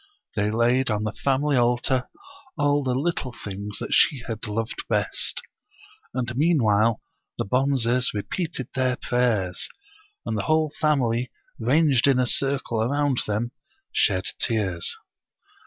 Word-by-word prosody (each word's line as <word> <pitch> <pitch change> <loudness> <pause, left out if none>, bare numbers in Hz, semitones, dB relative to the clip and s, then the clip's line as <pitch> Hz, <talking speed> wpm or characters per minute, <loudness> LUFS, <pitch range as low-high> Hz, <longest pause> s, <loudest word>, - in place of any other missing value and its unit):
They 105 -1 +1
laid 120 +4 +2
on 105 -1 0
the 110 - -1
family 140 +1 +1
altar 125 +2 +1 0.5
all 145 -1 +2
the 130 -2 0
little 145 -2 -1
things 100 -2 -6
that - - -4
she 135 -6 +4
had 110 -3 -3
loved 110 +2 -3
best. - - 0 0.7
And 120 -2 -2
meanwhile 115 -8 +3 0.3
the - - -1
Bonzes 125 +1 +2
repeated 130 - -3
their 130 -1 +1
prayers, 110 -8 0 0.6
and 110 - -2
the 105 - 0
whole 155 -1 +2
family, 125 -5 +1 0.3
ranged 135 +2 +3
in 135 -2 +4
a 125 - +3
circle 135 -3 0
around 140 +2 +1
them, 110 +3 -1 0.4
shed 95 0 +2
tears. 100 -8 0
125 Hz, 130 wpm, -24 LUFS, 110-140 Hz, 0.7 s, she